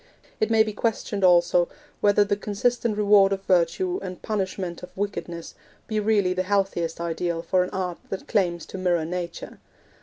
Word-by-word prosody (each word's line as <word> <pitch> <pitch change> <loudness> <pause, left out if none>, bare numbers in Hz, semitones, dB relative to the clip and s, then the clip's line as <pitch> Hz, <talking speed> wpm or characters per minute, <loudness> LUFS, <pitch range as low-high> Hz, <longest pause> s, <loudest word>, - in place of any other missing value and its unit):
It 215 - +1
may 225 -1 +5
be 215 -1 -4
questioned, 210 -2 -2
also, 175 -1 +4 0.3
whether 205 0 +4
the 205 0 0
consistent 215 +2 -1
reward 205 -2 +5
of 195 0 -2
virtue 190 - +1
and 180 -1 -6
punishment 190 -4 -3
of 180 - -9
wickedness 175 -4 -4 0.3
be 215 -1 -1
really 205 -3 +2
the 185 - 0
healthiest 185 -4 -1
ideal 170 0 -2
for 185 -1 +2
an 180 - -5
art 180 -2 -3
that 195 - -5
claims 175 -5 0
to 190 - -8
mirror 175 -3 +1
nature. 175 0 -5
190 Hz, 170 wpm, -25 LUFS, 175-205 Hz, 0.3 s, may